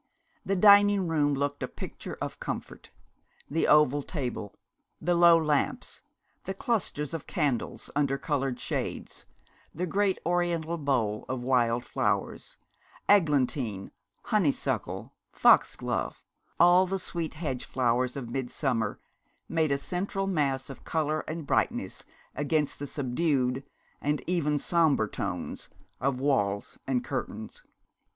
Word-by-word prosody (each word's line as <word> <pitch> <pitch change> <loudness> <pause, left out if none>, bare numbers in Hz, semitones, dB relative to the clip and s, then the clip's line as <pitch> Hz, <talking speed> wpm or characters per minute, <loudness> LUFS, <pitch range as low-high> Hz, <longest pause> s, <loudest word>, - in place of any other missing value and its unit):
The 195 - 0
dining 205 -1 +6
room 145 -3 +2
looked 145 +1 -2
a - - -1
picture - - -8
of - - -5
comfort. - - -6 0.6
The 160 +2 +1
oval 145 -1 +5
table, 125 - -4 0.4
the 175 - +1
low 170 -1 +7
lamps, 150 -3 -1 0.4
the 190 - -3
clusters 185 - -1
of 165 - -5
candles 145 - -1
under 140 -2 +1
coloured 135 -3 -1
shades, - - -4 0.5
the 175 +4 -1
great 195 +2 +1
Oriental 170 -1 0
bowl 120 -8 0
of 125 -1 -3
wild 120 -2 +2
flowers - - -2 0.5
eglantine, 135 - +2 0.3
honeysuckle, 185 -10 0 0.2
foxglove, - - +2 0.4
all 175 +2 +6
the 195 +1 -1
sweet 170 -4 -4
hedge 140 -6 -3
flowers 125 0 0
of 120 -4 -6
midsummer, 130 -2 -1 0.5
made 160 -3 +1
a 140 - +3
central 195 +6 -2
mass 140 -8 0
of 135 - -12
colour 155 -1 0
and 155 -1 -4
brightness - - 0 0.3
against 150 +1 0
the 145 - -4
subdued 135 -1 0 0.4
and 145 +1 0
even 155 -4 +1
sombre 155 -8 +2
tones - - -4 0.3
of 135 -1 0
walls 105 -8 0
and 125 -2 +1
curtains. 110 +1 -5
145 Hz, 120 wpm, -28 LUFS, 130-170 Hz, 0.6 s, low